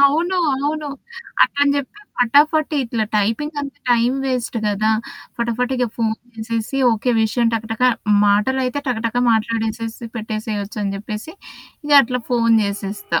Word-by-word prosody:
అవును. 320 +7 +3 0.2
అవును. 295 +2 -2 0.5
అట్లని 285 0 +3
జెప్పి 285 +9 -5 0.2
ఫటాఫట 290 +6 +3
ఇట్లా 230 -2 -1
టైపింగ్ 230 +9 -1
అంత 280 -1 -5 0.2
టైమ్ 240 +2 +3
వేస్ట్ 250 -2 -2
గదా! 210 +1 +1 0.5
ఫటాఫట 235 +1 -1
ఇగ 250 -1 +1
ఫోను 220 -1 0 0.2
చేసేసి, 225 +3 -3 0.2
ఓకే 230 +3 0
విషయం 230 +2 +1
టకటక 225 +1 -3 0.4
మాటలైతే 255 +6 +1
టకటక 230 0 -1 0.2
మాట్లాడేసేసి 225 +1 -2
పెట్టేసేయొచ్చు 215 -1 -4
అని 195 -1 -2
జెప్పేసి 210 +8 -6 0.5
ఇగ 295 - -1
అట్లా 250 +1 -2
ఫోను 230 -2 +4
జేసేస్తా. 200 - -2
230 Hz, 125 wpm, -20 LUFS, 220-270 Hz, 0.5 s, ఫోను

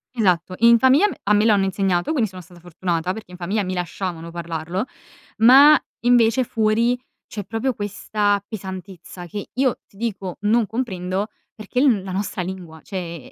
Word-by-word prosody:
Esatto, 185 -5 +1
in 235 +1 +7
famiglia 265 - +5
me 410 - -6
a 210 - +2
me 210 +1 +3
lo 225 - +5
hanno 195 -1 +2
insegnato, 190 - 0
quindi 245 -9 +1
sono 185 -1 -10
stata 175 0 -17
fortunata 175 0 -2
perché 215 -4 -10
in 180 - -10
famiglia 195 +4 -1
mi 185 0 -3
lasciavano 175 -1 -4
parlarlo, 170 +3 -4 0.5
ma, 270 +6 +8 0.2
invece, 240 0 +4
fuori, 230 +1 +1 0.3
c'è 205 - -6
proprio 225 +6 -2
questa 205 -1 -1
pesantezza 190 -3 -8
che 205 +4 -7
io, 260 -1 +1
ti 195 - -23
dico, 195 -5 -4
non 220 +2 +3
comprendo 195 -4 -3 0.3
perché 215 +3 -4
è - - +4
l 230 -9 +3
la 190 - -6
nostra 195 0 -3
lingua, 175 -3 -7
cioè, 170 -8 -7
200 Hz, 175 wpm, -22 LUFS, 180-225 Hz, 0.5 s, ma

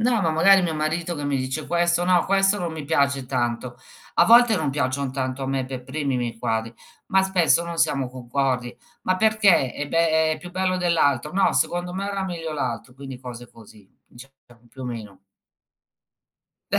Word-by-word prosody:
No, 235 -1 +2
ma 165 - +1
magari 185 +4 +5
mio 165 -2 -1
marito 160 +3 -2
che 145 - -5
mi 145 -1 0
dice: 130 +4 -3
"Questo, 175 0 +1
no, 180 -1 +3
questo 195 +1 +2
non 175 -3 -3
mi 155 -2 -6
piace 140 -3 +1
tanto." 120 -1 -2 0.4
A - - +5
volte 235 0 +7
non 155 -5 -1
piacciono 140 -1 -1
tanto 130 0 -3
a - - -3
me 135 -1 -1
per 130 -1 -6
primi 140 0 -2
i - - +1
miei 120 -2 -4
quadri, 115 0 -2 0.3
ma 190 0 +3
spesso 180 -3 +2
non 170 -1 -6
siamo 135 -5 +1
concordi. 125 0 -2 0.3
"Ma 185 - +1
perché?" 205 - +3
"Eh, 145 - -4
beh, 160 -1 +2
è - - -3
più 180 - -10
bello 185 0 0
dell'altro." 150 -6 +1
"No, 195 +1 +2
secondo 175 0 -1
me 195 +1 -3
era 200 -1 -3
meglio 165 -4 -5
l'altro." 125 -4 -4
Quindi 135 -1 -9
cose 120 -1 -10
così 105 -3 -17 0.2
diciamo, 135 +3 -15 0.3
più 130 - -11
o - - -5
meno. 110 -6 -7 1.5
Beh, - - +3
150 Hz, 195 wpm, -23 LUFS, 130-175 Hz, 1.5 s, volte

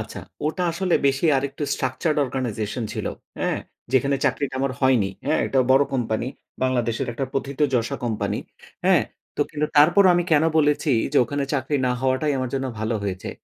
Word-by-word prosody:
আচ্ছা, - - -7 0.3
ওটা 160 +4 -1
আসলে 180 +1 0
বেশি 135 +4 +1
আরেকটু 140 +2 -3
structured 130 +4 -1
organization 120 -3 -3
ছিল। - - -4 0.3
হ্যাঁ, - - 0 0.3
যেখানে 140 +1 +3
চাকরিটা 140 0 0
আমার 135 -1 0
হয়নি। 125 -7 +3 0.2
হ্যাঁ, 155 - +2
এটা 135 - 0
বড় 135 +2 +6
কোম্পানি, 115 -2 -1 0.4
বাংলাদেশের 120 -3 0
একটা 135 +4 -2
প্রথিতযশা 135 -3 0
কোম্পানি। 110 -3 -1 0.5
হ্যাঁ, - - +5 0.3
তো - - -2
কিন্তু 150 0 -1
তারপরও 175 +7 +6
আমি 175 0 +2
কেন 150 0 +5
বলেছি 150 0 +2 0.2
যে, - - +1
ওখানে 145 +2 -2
চাকরি 140 +2 0
না 125 - +2
হওয়াটাই 130 +3 +1
আমার 130 -1 -2
জন্য 135 0 -1
ভালো 110 +2 -1
হয়েছে। 95 -2 -4
135 Hz, 165 wpm, -23 LUFS, 125-145 Hz, 0.5 s, বড়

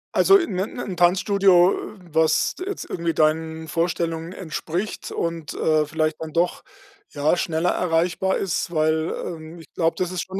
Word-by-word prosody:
Also, 390 - +7
in 210 - -2
'n 210 +5 -3
'n 190 -6 -4
Tanzstudio, 185 +1 +4 0.4
was 160 0 +2
jetzt 400 +1 -5
irgendwie 170 -2 -2
deinen 160 +1 0
Vorstellungen 165 0 -2
entspricht 185 +2 -4
und, 165 -3 -3
äh, 155 -1 +2
vielleicht 155 0 -1
dann 160 -1 -6
doch, 170 +1 0 0.5
ja, 150 +4 +1
schneller 170 0 0
erreichbar 175 +2 +1
ist, 180 -2 -2
weil, 155 0 +1
ähm, 165 -1 -8
ich 165 - -15
glaube, 165 -2 +1
das 180 -1 -1
ist 180 -2 -2
schon, 190 +1 -5
170 Hz, 155 wpm, -23 LUFS, 160-180 Hz, 0.5 s, Also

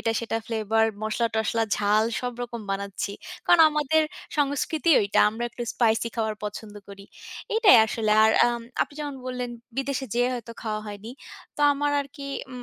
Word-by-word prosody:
এটা 225 - 0
সেটা 230 -1 -2
ফ্লেভার 220 0 +1 0.2
মসলা-টসলা 225 0 0
ঝাল 210 +1 +2 0.2
সবরকম 245 -1 -5
বানাচ্ছি। 200 0 -3 0.3
কারণ 350 - +6
আমাদের 300 +1 +2 0.4
সংস্কৃতিই 290 +3 +2
ঐটা। 200 - +2
আমরা 225 +3 -4
একটু 240 - -7
স্পাইসি 230 -1 +1
খাবার 220 -2 -1
পছন্দ 210 0 -7
করি, 200 0 -11 0.5
এইটাই 440 - +7
আসলে। 220 -1 -2
আর 220 - +5 0.2
আম 240 0 -1 0.2
আপনি - - -8
যেমন 290 -2 -4
বললেন 250 -1 -4 0.3
বিদেশে 270 0 -2
যেয়ে 245 +1 +2
হয়তো 230 -1 -7
খাওয়া 215 -1 -3
হয়নি। 205 +2 -8 0.5
তো - - -6
আমার 290 +1 -1
আরকি 280 0 -8 0.2
উম 250 -1 -8
235 Hz, 155 wpm, -25 LUFS, 215-270 Hz, 0.5 s, এইটাই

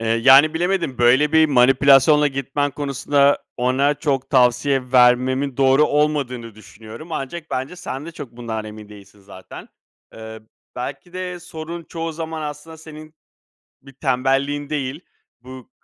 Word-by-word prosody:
Eee, 115 - -4
yani, 135 +7 +5
bilemedim. 175 -5 -1
Böyle 130 +5 +3
bir 160 0 +5
manipülasyonla 140 +2 +4
gitmen 135 +1 -2
konusunda 140 0 +1 0.2
ona 130 +4 +1
çok 140 -3 -3
tavsiye 130 0 +1
vermemin 130 +2 +3
doğru 135 +2 +4
olmadığını 140 -6 -1
düşünüyorum. 110 - -13
Ancak 155 +3 -6
bence 135 +6 -4
sen 150 -4 -7
de 170 - -9
çok 135 -6 -10
bundan 115 -2 -6
emin 105 -1 -11
değilsin 105 0 -16
zaten. 95 -1 -13 0.5
Iıı, 110 0 -10 0.3
belki 140 +8 -7
de 180 -1 -6
sorun 165 0 -8
çoğu 165 -1 -6
zaman 160 0 -6
aslında 150 +2 -8
senin 155 0 -13 0.7
bir 135 0 -15
tembelliğin 135 +2 -1
değil, 145 0 -3 0.4
bu 130 -1 -13
135 Hz, 135 wpm, -20 LUFS, 125-155 Hz, 0.7 s, yani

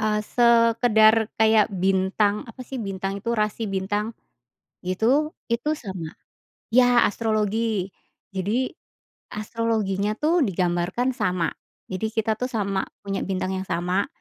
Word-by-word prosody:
eee, 215 0 +1
sekadar 230 -2 +4
kayak 220 -1 +5
bintang, 195 +2 +1
apa 240 +3 -11
sih 265 -3 -5
bintang 195 0 -4
itu? 235 - -3
Rasi 215 +1 -1
bintang, 205 +4 -2 0.7
gitu, 240 - +1 0.2
itu 240 +6 0
sama. 185 - -7 0.6
Iya 245 -1 +6
astrologi. 215 -2 0 0.5
Jadi 215 +8 0 0.7
astrologinya 210 -2 -1
tuh 330 +3 +2
digambarkan 180 +5 0
sama. 180 -2 0 0.4
Jadi 190 +4 -2
kita 220 -1 0
tuh 250 - 0
sama, 200 -3 -1 0.2
punya 195 -1 -2
bintang 185 -1 -2
yang 190 0 -4
sama, 180 +3 0
210 Hz, 120 wpm, -24 LUFS, 190-230 Hz, 0.7 s, Iya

